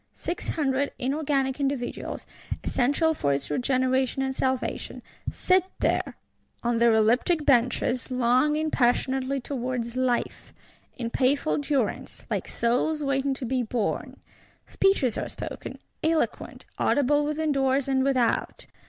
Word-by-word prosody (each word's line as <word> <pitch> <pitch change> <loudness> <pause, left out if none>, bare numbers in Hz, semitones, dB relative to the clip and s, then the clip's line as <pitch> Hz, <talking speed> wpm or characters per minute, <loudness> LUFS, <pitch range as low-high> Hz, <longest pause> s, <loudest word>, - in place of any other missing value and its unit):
Six 345 - -4
Hundred 280 -2 0
inorganic 275 0 0
individuals, 275 -3 -3 0.4
essential 290 +6 +2
for 140 - 0
its 140 +1 -3
regeneration 260 - +1
and 265 0 -2
salvation, 260 -1 -2 0.3
sit 370 -1 +3 0.2
there, - - 0 0.5
on 235 -1 +1
their 235 0 +5
elliptic 245 +9 +3
benches, 250 -1 +2
longing 260 +5 +2
passionately 260 +2 +1
towards 245 -2 -3
life; 255 -2 -1 0.4
in 235 -2 -3
painful 280 +5 +2
durance; 280 -5 -2
like - - -1
souls 275 +6 0
waiting 275 0 0
to 260 - -5
be 255 +1 0
born. 230 -2 -2 0.5
Speeches 335 - +2
are - - -4
spoken; - - -7 0.3
eloquent; 320 0 -1
audible 290 +1 +3
within 305 +1 -1
doors 270 -1 +1
and 265 -1 +2
without. 255 -4 0
265 Hz, 120 wpm, -26 LUFS, 245-285 Hz, 0.5 s, their